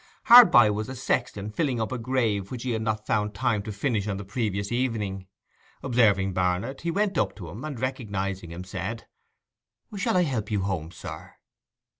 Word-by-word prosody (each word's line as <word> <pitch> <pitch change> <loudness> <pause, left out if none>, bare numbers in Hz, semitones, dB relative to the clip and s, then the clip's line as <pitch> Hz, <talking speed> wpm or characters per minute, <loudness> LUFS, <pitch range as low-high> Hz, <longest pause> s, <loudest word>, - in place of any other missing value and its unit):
Hard 245 -4 +10
by 110 -10 +6
was 105 +3 -3
a 130 - -6
sexton 115 -5 -2
filling 130 0 -1
up 110 +1 -2
a 130 - -3
grave 115 -5 0
which 125 -2 -6
he 130 - -2
had 110 -1 -1
not 110 -1 -2
found 105 -2 0
time 115 -1 0
to 105 - -6
finish 105 -1 -1
on 100 -2 -2
the 100 - -6
previous 100 -1 -2
evening. 105 -6 -2 0.6
Observing 105 -7 +3
Barnet, 90 +8 -1
he 170 - -2
went 200 +3 0
up - - 0
to 90 -6 -9
him, 105 +10 -8
and 150 -6 -5
recognizing 100 -8 -3
him, 85 +2 -7
said, 95 +5 -5 0.9
'Shall 190 -2 0
I 180 - +4
help 120 -9 -2
you 105 -3 0
home, 90 -5 -2
sir? 85 - -9
110 Hz, 190 wpm, -26 LUFS, 100-130 Hz, 0.9 s, Hard